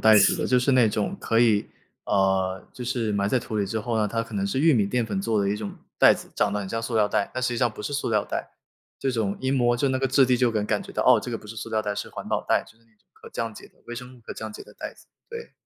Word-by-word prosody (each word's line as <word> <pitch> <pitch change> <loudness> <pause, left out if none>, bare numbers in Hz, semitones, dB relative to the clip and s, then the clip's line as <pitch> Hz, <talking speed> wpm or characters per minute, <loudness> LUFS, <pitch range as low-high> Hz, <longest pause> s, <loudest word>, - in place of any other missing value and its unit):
袋 110 -1 +7
子 100 -2 +5
的。 - - -1
就 125 - +4
是 125 - +2
那 125 -3 +5
种 105 - -1
可 115 0 +2
以， 110 -4 +3 0.4
呃， 95 -1 +1
就 125 - -7
是 120 -3 -1
埋 100 0 +1
在 130 - +2
土 110 -2 -5
里 100 - +1
之 110 +3 -2
后 115 +1 -2
呢， 105 - +2
它 115 +2 -1
可 115 - -12
能 100 0 0
是 115 +7 -1
玉 160 +2 +5
米 110 -7 +3
淀 120 +3 0
粉 100 -3 -2
做 110 0 +1
的 100 - +1
一 105 - 0
种 105 -1 -5 0.3
袋 - - +7
子， - - -10
长 - - +2
得 105 - -1
很 95 - -5
像 115 - -2
塑 115 +1 -4
料 105 -2 +3
袋， 100 - 0
但 130 - -2
实 125 - +2
际 120 - -2
上 120 0 +3
不 110 - -9
是 145 - -4
塑 145 -4 -1
料 105 -2 +2
袋。 - - -5 0.5
这 135 - +1
种 105 -4 -1
一 130 - 0
摸 120 -3 +3
就 135 +3 +1
那 130 0 0
个 135 - +1
质 135 +1 +5
地 125 0 +3
就 125 -1 +3
能 105 -2 0
感 105 -1 +1
觉 - - -11
到， - - 0
哦， 125 -3 +6
这 125 - -6
个 115 - -2
不 - - -14
是 115 - -8
塑 115 - -5
料 110 -1 +1
袋， 105 -1 -2
是 105 - -4
环 - - -8
保 - - -1
袋， - - +3
就 110 - -20
是 115 - -29
那 115 - -31
种 - - -39
可 - - -14
降 115 -1 -3
解 - - -11
的， - - -26
微 120 - -6
生 125 +1 -9
物 - - -19
可 110 - -8
降 110 -1 -6
解 - - -9
的 - - -16
袋 - - -6
子， - - -20 0.2
对。 465 0 -8
115 Hz, 355 characters per minute, -25 LUFS, 105-125 Hz, 0.5 s, 袋